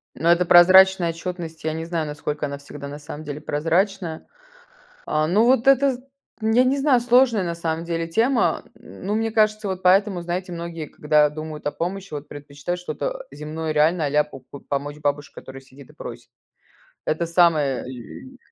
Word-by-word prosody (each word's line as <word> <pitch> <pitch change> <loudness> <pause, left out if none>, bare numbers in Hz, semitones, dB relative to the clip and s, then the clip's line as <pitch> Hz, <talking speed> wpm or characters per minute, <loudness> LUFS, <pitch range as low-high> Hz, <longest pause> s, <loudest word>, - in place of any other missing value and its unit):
Но 170 +2 +1
это 175 +1 +4
прозрачная 185 0 +7
отчетность, 165 -2 -7
я 155 - 0
не 160 +1 -4
знаю, 165 -2 -2
насколько 150 0 -4
она 140 0 -6
всегда 140 0 -9
на 145 +1 -7
самом 150 +1 -9
деле 145 +1 -6
прозрачная. 165 +3 -1 0.8
А, 155 0 0
ну, 210 +7 +3
вот 250 -1 +3
это, 275 0 +5
з - - -7 0.4
нь 220 +2 +1
я 250 - +7
не 270 +2 +2
знаю, 270 -3 +3
сложная 240 -4 +3
на 170 -1 -3
самом 165 0 -3
деле 165 -1 -2
тема. 230 +8 +1
М, - - -13
ну, 205 +2 0
мне 225 0 -1
кажется, 215 -1 +2
вот 190 -1 -4
поэтому, 190 0 +3
знаете, 180 +2 -4
многие, 170 -2 -6
когда 150 0 +2
думают 155 0 -8
о - - -1
помощи, 190 +2 -5
вот 145 0 -6
предпочитают 145 +4 -6
что-то, - - -4
э, - - -12
земное, 155 +1 -4
реальное, 155 +1 +2
а-ля 150 +1 +3
по 145 -3 -12
по 135 +2 -13
помочь 145 +1 -4
бабушке, 145 0 -2
которая 135 0 -10
сидит 135 +1 -16
и - - -16
просит. - - -9 0.8
Это 160 +2 0
самое 165 -6 +2
лю 130 - -10
170 Hz, 190 wpm, -22 LUFS, 150-195 Hz, 0.8 s, прозрачная